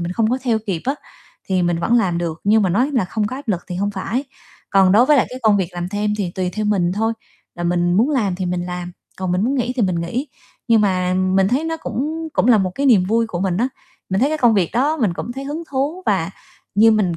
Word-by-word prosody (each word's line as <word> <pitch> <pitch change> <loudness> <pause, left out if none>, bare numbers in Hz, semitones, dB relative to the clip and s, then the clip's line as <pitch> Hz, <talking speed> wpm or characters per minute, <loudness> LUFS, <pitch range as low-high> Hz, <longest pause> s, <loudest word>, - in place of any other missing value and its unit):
mình 175 +1 -3
không 220 +2 +1
có 255 - +1
theo 230 -4 +1
kịp 175 -5 -2
á, 270 +2 0 0.5
thì 185 -2 0
mình 175 -1 +1
vẫn 235 +7 +2
làm 180 -6 0
được 170 -2 -3
nhưng 215 +1 +4
mà 190 - +2
nói 250 +10 +2
là 240 -8 +2
không 210 +3 -2
có 255 - -5
áp 275 -4 -10
lực 180 -4 0
thì 180 - -4
hông 200 +2 -1
phải. 230 +7 -3 0.5
Còn 195 -2 +5
đối 240 +5 +5
với 300 - +5
lại 260 - +3
cái 255 - -6
công 215 -2 +4
việc 190 -4 0
làm 175 0 -4
thêm 210 +1 -1
thì 195 -5 -2
tùy 185 -1 -1
theo 215 +4 -3
mình 185 -4 +1
thôi, 225 +3 0 0.4
là 175 - -5
mình 175 0 +1
muốn 235 +9 +3
làm 215 -10 +1
thì 185 0 -3
mình 175 0 -2
làm, 180 0 -5 0.3
còn 185 -2 -2
mình 185 +4 +1
muốn 270 +3 +1
nghỉ 250 -1 -1
thì 240 - +1
mình 180 -4 0
nghỉ, 240 - -3 0.4
nhưng 225 -2 +5
mà 185 -2 +1
mình 185 +1 +2
thấy 265 +7 0
nó 325 0 -2
cũng 320 +2 -4
cũng 250 - +1
là 230 - +6
một 185 -2 0
cái 280 - 0
niềm 215 -8 +5
vui 225 +4 +1
của 175 -6 -4
mình 185 -2 0
á. 245 +5 +1 0.4
Mình 190 +3 0
thấy 275 - +3
cái 310 - -1
công 240 -4 +4
việc 185 -5 +1
đó 280 +7 +1
mình 220 - +1
cũng 240 - -5
thấy 270 +2 -6
hứng 300 +4 -4
thú 290 +7 -2
và 190 -3 +1 0.4
như 220 +3 +6
mình 195 -6 +1
205 Hz, 275 wpm, -20 LUFS, 180-245 Hz, 0.5 s, là